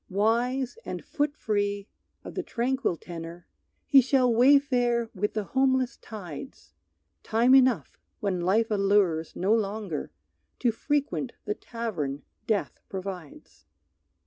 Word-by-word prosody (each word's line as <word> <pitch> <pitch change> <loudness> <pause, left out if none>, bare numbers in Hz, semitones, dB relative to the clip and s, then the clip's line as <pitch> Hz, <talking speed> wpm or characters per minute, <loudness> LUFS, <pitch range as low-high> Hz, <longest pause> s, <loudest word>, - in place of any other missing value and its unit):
Wise 235 - 0
and - - -6
foot 295 -1 -1
free, 205 -1 -1 0.4
of - - -8
the - - -2
tranquil 260 - -1
tenor, 170 0 -8 0.4
He 275 -2 +7
shall 255 -1 +3
wayfare 245 -2 +4
with 210 +2 -2
the 215 - 0
homeless 260 +2 +1
tides; 175 - -9 0.5
Time 235 +4 +3
enough, 260 -2 +4 0.2
when 190 -4 -1
life 215 +6 +2
allures 195 -6 +2
no 195 +4 +2
longer, 205 -7 -2 0.5
To 240 - +2
frequent 280 +1 -1
the 210 - 0
tavern 180 - -4 0.2
death 215 -3 -1
provides. 185 -5 -8
220 Hz, 120 wpm, -27 LUFS, 195-255 Hz, 0.5 s, He